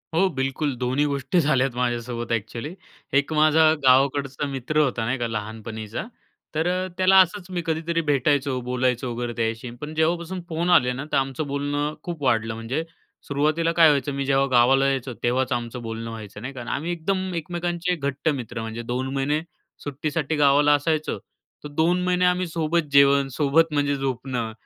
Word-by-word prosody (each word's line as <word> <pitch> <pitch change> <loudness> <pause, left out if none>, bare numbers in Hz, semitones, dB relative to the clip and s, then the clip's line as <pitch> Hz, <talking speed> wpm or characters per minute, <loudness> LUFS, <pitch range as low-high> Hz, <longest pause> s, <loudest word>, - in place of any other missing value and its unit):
हो, 190 +3 +4
बिलकुल 135 +2 -1
दोन्ही 130 +4 0
गोष्टी 140 +5 0
झाल्यात 135 -5 +2
माझ्यासोबत 120 -1 -2
ॲक्चुअली. 115 - -4 0.4
एक 140 +3 +1
माझा 155 +1 +4 0.2
गावाकडचा 135 +2 +3
मित्र 135 +3 -3
होता, 125 -6 +1
नाही 130 +3 0
का, 120 - -1
लहानपणीचा, 110 - -5 0.5
तर 160 +2 +1
अ, 185 +1 0
त्याला 190 +1 +6
असंच 185 +1 -1
मी 180 -2 -2
कधीतरी 165 +1 -1
भेटायचो, 140 -1 +1
बोलायचो 125 0 -1
वगैरे 120 0 -3
त्याच्याशी. 115 +1 -2
पण 150 +1 -6
जेव्हापासून 170 +3 0
फोन 170 +2 -1
आले 125 -8 +5
ना, 130 +3 -5
तर - - +2
आमचं 135 +2 -1
बोलणं 145 +1 -2
खूप 170 -4 -6
वाढलं. 115 -3 +1
म्हणजे 115 +7 -3 0.4
सुरुवातीला 155 +4 +1
काय 165 -2 +8
व्हायचं, 145 -1 +1
मी 140 0 -2
जेव्हा 135 0 +3
गावाला 130 +2 +5
यायचो 135 -2 -2
तेव्हाचं 125 +1 +1
आमचं 120 0 -5
बोलणं 115 0 -5
व्हायचं 105 -2 -9
नाही 130 +4 -6
का? 130 - -7
आम्ही 165 +4 -2
एकदम 185 +2 -2
एकमेकांचे 175 +1 -2
घट्ट 140 0 -2
मित्र 120 -5 -4
म्हणजे 115 +1 -5
2 125 +3 -3
महिने 145 +3 0 0.4
सुट्टीसाठी 150 +2 -2
गावाला 145 0 +4
असायचो. 155 +2 0 0.5
तर - - -5
2 165 +5 +1
महिने 180 0 +2
आम्ही 180 0 +2
सोबत 165 -1 -1
जेवण, 140 0 +5
सोबत 155 +4 +2
म्हणजे 145 -1 +1
झोपणं, 125 -3 -3
140 Hz, 170 wpm, -24 LUFS, 125-160 Hz, 0.5 s, काय